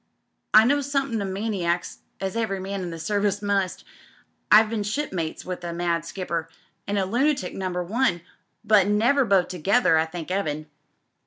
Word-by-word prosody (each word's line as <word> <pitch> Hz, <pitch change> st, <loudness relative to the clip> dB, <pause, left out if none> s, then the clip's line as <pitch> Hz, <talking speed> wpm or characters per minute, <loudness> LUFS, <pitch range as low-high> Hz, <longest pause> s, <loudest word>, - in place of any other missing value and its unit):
I 215 Hz, +1 st, +8 dB
know 285 Hz, +3 st, +3 dB
somethin' 275 Hz, -5 st, -1 dB
o' -, -, -2 dB
maniacs, 190 Hz, -3 st, -2 dB
„ -, -, -46 dB
eve^ 220 Hz, +4 st, -2 dB
1, 190 Hz, -, -6 dB, 0.2 s
in 180 Hz, -, -4 dB
d» 165 Hz, -, -6 dB
Service 205 Hz, +3 st, 0 dB
muBt 200 Hz, -3 st, -1 dB, 0.7 s
I've 215 Hz, +1 st, +7 dB
bee. 230 Hz, -, -1 dB
^po».e, 205 Hz, -, -3 dB
with 180 Hz, -1 st, -5 dB
a 170 Hz, -1 st, -4 dB
mad 170 Hz, -1 st, -1 dB
skipper 170 Hz, -2 st, -4 dB, 0.2 s
— -, -, -44 dB
an' 205 Hz, 0 st, -1 dB
a 195 Hz, -, +1 dB
lunatic 245 Hz, -1 st, 0 dB
Number 180 Hz, -2 st, -3 dB
One, 180 Hz, -2 st, 0 dB, 0.4 s
but 210 Hz, -3 st, +4 dB
never 235 Hz, +7 st, +3 dB
both 195 Hz, -4 st, +3 dB
together 180 Hz, 0 st, +3 dB
I 160 Hz, -, +1 dB
thank 170 Hz, +1 st, -7 dB
'Eaven. 155 Hz, -6 st, -2 dB
195 Hz, 170 wpm, -24 LUFS, 175-220 Hz, 0.7 s, I